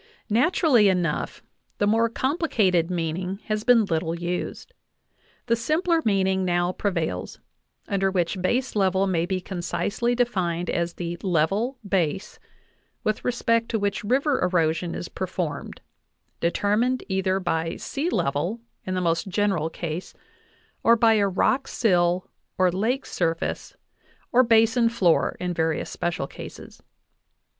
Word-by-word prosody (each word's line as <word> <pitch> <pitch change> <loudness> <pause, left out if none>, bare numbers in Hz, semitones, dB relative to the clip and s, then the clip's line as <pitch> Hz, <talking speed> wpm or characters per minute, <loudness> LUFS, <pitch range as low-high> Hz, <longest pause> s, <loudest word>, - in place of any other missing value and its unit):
Nat 245 - +3
urally 245 - +4
enough, 175 -5 -1 0.3
the 205 - +1
more 225 +2 +3
complicated 225 - +1
meaning 180 +2 -2
has 215 -1 -2
been 235 -3 +5
little 165 -2 -1
used. 175 +1 -4 0.7
The 230 - +2
simpler 325 +8 +1
meaning 190 -2 +2
now 175 0 +1
prevails, 170 - -3 0.5
under 195 -1 +1
which 185 0 -1
base 250 +7 0
level 190 -1 +2
may 175 -3 0
be 190 -1 -1
concisely 200 +6 -2
defined 185 -8 0
as 170 0 -1
the 170 0 -4
"level 195 - 0
base" 190 0 -1 0.6
with 215 0 -1
respect 230 -1 +1
to 225 - 0
which 205 0 -1
river 270 +6 +1
erosion 170 -1 +1
is 175 - -5
performed, 180 -4 -4 0.6
determined 210 +8 +1
either 190 0 0
by 165 -2 -1
sea 295 +5 -3
level 170 - -1 0.3
in 185 - -1
the 185 - 0
most 165 +1 0
general 190 -5 0
case 165 +1 -5 0.7
or 230 - +6
by 230 -1 +4
a 205 -2 +3
rock 250 +8 +1
sill 180 -4 +1 0.3
or 185 -1 +3
lake 225 +9 -1
surface 165 -2 -2 0.6
or 250 - +6
basin 230 0 +4
floor 190 -8 +2
in 180 -1 -2
various 160 -1 -1
special 175 -5 -2
cases. - - -11
190 Hz, 135 wpm, -25 LUFS, 175-230 Hz, 0.7 s, or